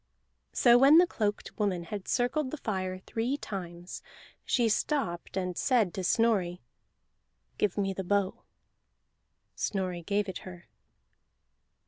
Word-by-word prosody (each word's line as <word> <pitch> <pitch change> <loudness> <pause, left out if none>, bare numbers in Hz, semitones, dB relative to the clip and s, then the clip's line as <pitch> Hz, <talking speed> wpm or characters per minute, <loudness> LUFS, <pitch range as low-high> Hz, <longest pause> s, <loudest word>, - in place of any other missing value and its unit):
So 240 -1 +5
when 280 +4 +8
the 355 - +8
cloaked 210 -11 -3
woman 190 -5 0
had 195 +3 -6
circled 260 +3 0
the 310 - -5
fire 185 -7 -3
three 230 +8 -2
times, 175 -7 -7 0.4
she 240 -2 +2
stopped 210 - -1
and 180 -1 -2
said 225 -8 +2
to 190 - -4
Snorri, 185 -4 +2 1.0
"Give 205 -2 +1
me 195 -1 0
the 190 - -4
bow." 200 0 0 1.1
Snorri 185 -3 -2
gave 200 +3 0
it 190 - -5
her. 180 -2 -11
200 Hz, 125 wpm, -29 LUFS, 180-235 Hz, 1.1 s, when